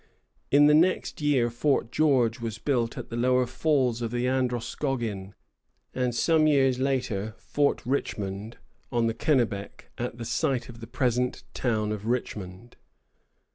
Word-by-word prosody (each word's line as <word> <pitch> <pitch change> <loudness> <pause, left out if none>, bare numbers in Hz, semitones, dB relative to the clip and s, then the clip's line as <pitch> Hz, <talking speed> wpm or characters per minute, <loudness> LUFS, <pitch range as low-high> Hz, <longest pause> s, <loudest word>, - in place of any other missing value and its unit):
In 145 +1 +6
the 150 - +6
next 175 +1 +2
year 135 -5 +2
Fort 120 0 0
George 130 -7 +2
was 115 -2 -4
built 120 -2 -1
at - - -7
the 115 - -5
lower 125 +1 +2
falls 130 -4 +1
of 115 - -1
the 120 +1 -1
Androscoggin, 120 -5 -2 0.6
and 125 -2 -1
some 155 +5 +3
years 135 -4 +3
later 125 -6 -1
Fort 145 -1 0
Richmond, 105 -4 -3 0.3
on 120 -2 +1
the 115 - +1
Kennebec, 115 -6 -1
at 120 -1 -3
the 115 - -6
site 135 -1 -1
of 115 -1 -11
the 115 - -9
present 125 0 -1
town 110 -4 0
of 105 0 -5
Richmond. 110 -3 -4
120 Hz, 145 wpm, -27 LUFS, 115-135 Hz, 0.6 s, In